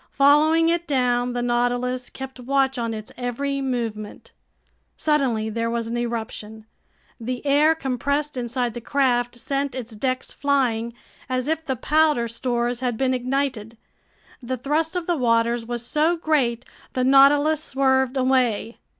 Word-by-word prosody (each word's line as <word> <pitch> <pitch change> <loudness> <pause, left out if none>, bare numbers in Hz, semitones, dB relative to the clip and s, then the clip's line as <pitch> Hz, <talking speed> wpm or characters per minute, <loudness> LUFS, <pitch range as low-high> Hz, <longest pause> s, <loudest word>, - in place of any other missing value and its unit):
Following 310 +4 +4
it 340 0 0
down, 245 -3 +1
the 245 0 -2
Nautilus 245 +1 0
kept 265 -1 -9
watch 265 +1 +1
on 230 -1 -2
its 215 -1 -7
every 275 +3 -2
movement. 230 -5 -4 0.7
Suddenly 270 -8 +1
there 230 +1 -1
was 230 0 -2
an 230 +1 -4
eruption. 220 -2 -5 0.5
The 245 +3 -5
air 295 +3 +4
compressed 280 +1 -2
inside 245 -1 -2
the 240 - -6
craft 245 -2 +1
sent 275 +2 -2
its 240 -3 -6
decks 255 +3 -2
flying, 240 -5 0 0.3
as 255 +1 -1
if 320 +1 -1
the 270 -4 -2
powder 300 -2 +2
stores 240 0 -2
had 245 -3 -2
been 260 +1 +1
ignited. 250 -3 -2 0.6
The 255 +1 -3
thrust 310 +7 -1
of 355 -2 -2
the 345 -1 0
waters 230 -2 +1
was 240 -1 -4
so 310 +6 +1
great, 260 -7 0 0.3
the 255 - 0
Nautilus 285 +3 +5
swerved 265 -1 +1
away. 255 -4 +1
255 Hz, 145 wpm, -23 LUFS, 235-280 Hz, 0.7 s, Nautilus